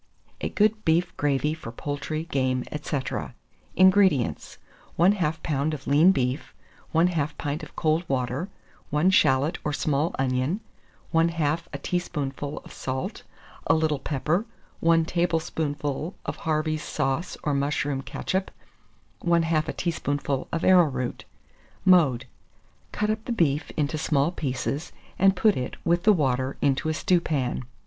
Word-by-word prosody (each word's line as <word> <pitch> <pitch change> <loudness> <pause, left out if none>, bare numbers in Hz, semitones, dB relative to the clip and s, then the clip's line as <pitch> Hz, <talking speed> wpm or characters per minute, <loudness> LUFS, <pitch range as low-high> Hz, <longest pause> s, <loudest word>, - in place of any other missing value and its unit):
A - - -1
GOOD 215 +1 +2
BEEF 170 +2 +1
GRAVY 145 +1 +1
FOR 155 -8 -8
POULTRY, 145 +5 -4
GAME, 130 -2 +1
&c. 150 0 -5
435. 140 -4 -3 0.4
INGREDIENTS. 185 - +3 0.4
1/2 180 +4 +5
lb. 155 -2 -1
of 140 - -11
lean 155 +6 +6
beef, 130 -3 -2 0.4
1/2 160 -3 +1
pint 145 +2 -3
of - - -11
cold 155 +1 +1
water, 130 +6 -1 0.4
1 150 +6 +3
shalot 150 -1 +3
or 150 - -1
small 150 +2 0
onion, 130 +7 0 0.5
1/2 165 -1 +2
a 140 - -4
teaspoonful 145 -3 -3
of - - -12
salt, 130 0 -4 0.5
a - - +5
little 155 -2 +1
pepper, 155 - -1 0.3
1 165 -1 +4
tablespoonful 160 -2 -1
of - - -3
Harvey's 155 -1 -1
sauce 150 +5 -2
or 150 - 0
mushroom 140 0 0
ketchup, 190 +7 -2 0.7
1/2 165 -2 +2
a - - -2
teaspoonful 145 -5 -2
of 165 - -2
arrowroot. 150 -10 +3 0.6
Mode. 150 -10 +5 0.7
Cut 210 0 0
up 215 0 -3
the - - -3
beef 155 -9 +1
into 150 0 0
small 150 0 +2
pieces, 145 +1 -3 0.3
and 195 0 +5
put 215 +2 +3
it, 125 0 -3
with 175 +1 +2
the 215 - +7
water, 130 -5 0
into 140 +2 +1
a - - +1
stewpan. 150 -9 0
155 Hz, 135 wpm, -26 LUFS, 140-170 Hz, 0.7 s, the